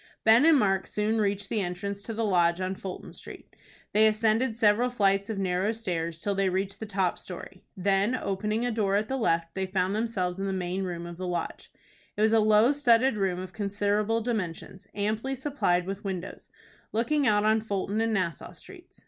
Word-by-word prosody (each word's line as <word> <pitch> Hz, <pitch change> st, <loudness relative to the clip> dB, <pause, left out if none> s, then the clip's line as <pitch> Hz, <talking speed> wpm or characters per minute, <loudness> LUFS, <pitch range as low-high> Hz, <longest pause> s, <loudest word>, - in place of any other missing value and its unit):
Ben 225 Hz, +6 st, +6 dB
and 325 Hz, -2 st, +6 dB
Mark 195 Hz, -5 st, +1 dB
soon 215 Hz, +1 st, 0 dB
reached 200 Hz, -1 st, -1 dB
the 215 Hz, 0 st, -1 dB
entrance 195 Hz, +2 st, -4 dB
to 225 Hz, -, -7 dB
the 225 Hz, 0 st, -1 dB
Lodge 175 Hz, -3 st, +2 dB
on 185 Hz, 0 st, -2 dB
Fulton 190 Hz, -1 st, -8 dB
Street. -, -, -12 dB, 0.4 s
They 215 Hz, +1 st, +6 dB
ascended 220 Hz, +2 st, +1 dB
several 225 Hz, +2 st, +3 dB
flights 200 Hz, -4 st, +1 dB
of 220 Hz, -, -3 dB
narrow 190 Hz, +2 st, 0 dB
stairs 170 Hz, -7 st, -3 dB
till 200 Hz, +4 st, -2 dB
they 195 Hz, -1 st, +1 dB
reached 190 Hz, +2 st, -2 dB
the 220 Hz, -, -6 dB
top 190 Hz, -3 st, 0 dB
story. 185 Hz, +1 st, -9 dB, 0.2 s
Then, 195 Hz, +5 st, +1 dB
opening 210 Hz, +1 st, -2 dB
a 245 Hz, -, 0 dB
door 205 Hz, -3 st, 0 dB
at 210 Hz, +1 st, +1 dB
the 270 Hz, -, -1 dB
left, 165 Hz, -8 st, 0 dB
they 190 Hz, 0 st, -2 dB
found 185 Hz, 0 st, 0 dB
themselves 195 Hz, -5 st, -2 dB
in 195 Hz, -, -2 dB
the 195 Hz, -, -1 dB
main 185 Hz, 0 st, -2 dB
room 170 Hz, -1 st, -5 dB
of 170 Hz, 0 st, -8 dB
the 185 Hz, 0 st, -4 dB
Lodge. 175 Hz, -1 st, -4 dB, 0.5 s
It -, -, -1 dB
was 220 Hz, +1 st, +4 dB
a 225 Hz, -, +5 dB
low 215 Hz, +3 st, +5 dB
studded 265 Hz, -3 st, +3 dB
room 190 Hz, -3 st, 0 dB
of 185 Hz, 0 st, -7 dB
considerable 205 Hz, +2 st, 0 dB
dimensions, 200 Hz, -4 st, -4 dB
amply 220 Hz, +6 st, -1 dB
supplied 260 Hz, -10 st, 0 dB
with 195 Hz, +1 st, -5 dB
windows, 190 Hz, -3 st, -6 dB, 0.4 s
looking 265 Hz, +6 st, +1 dB
out 210 Hz, 0 st, +3 dB
on 220 Hz, 0 st, +3 dB
Fulton 205 Hz, 0 st, -2 dB
and 225 Hz, 0 st, +1 dB
Nassau 185 Hz, -7 st, -2 dB
Streets. -, -, -14 dB
205 Hz, 200 wpm, -27 LUFS, 185-220 Hz, 0.5 s, Ben